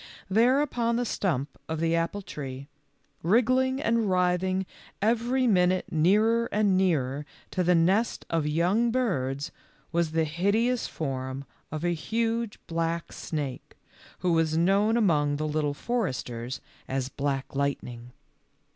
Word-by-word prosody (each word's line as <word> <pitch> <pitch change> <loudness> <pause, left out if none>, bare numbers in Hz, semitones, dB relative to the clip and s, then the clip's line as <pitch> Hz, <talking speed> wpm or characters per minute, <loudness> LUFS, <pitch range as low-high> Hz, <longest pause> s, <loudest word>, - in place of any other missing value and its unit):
There 245 +7 +4
upon 235 -4 0
the 245 +1 0
stump 155 - -2
of 160 -1 -2
the 165 0 +2
apple 170 +5 -1
tree, 135 -4 -7 0.5
wriggling 255 +7 +3
and 230 -7 +1
writhing 185 +1 +1 0.3
every 240 +4 +1
minute 185 -4 +2
nearer 215 +8 +3
and 205 -2 +3
nearer 150 -7 +1 0.3
to 185 - 0
the 180 0 +4
nest 190 +8 +2
of 165 -3 0
young 180 +10 +2
birds, 145 - -1 0.4
was 170 -2 0
the 160 0 +2
hideous 200 +10 +1
form 135 -2 -4 0.3
of 155 +1 -4
a 175 - +2
huge, 225 +5 -1
black 165 0 -2
snake, 140 -5 -5 0.4
who 180 -1 +2
was 160 -1 +2
known 200 +6 +3
among 150 -9 +2
the 155 +1 -2
Little 150 -1 -1
Foresters 130 - -3 0.3
as 130 -1 -1
Black 135 -1 -3
Lightning. 125 -4 -3
175 Hz, 130 wpm, -27 LUFS, 150-225 Hz, 0.5 s, There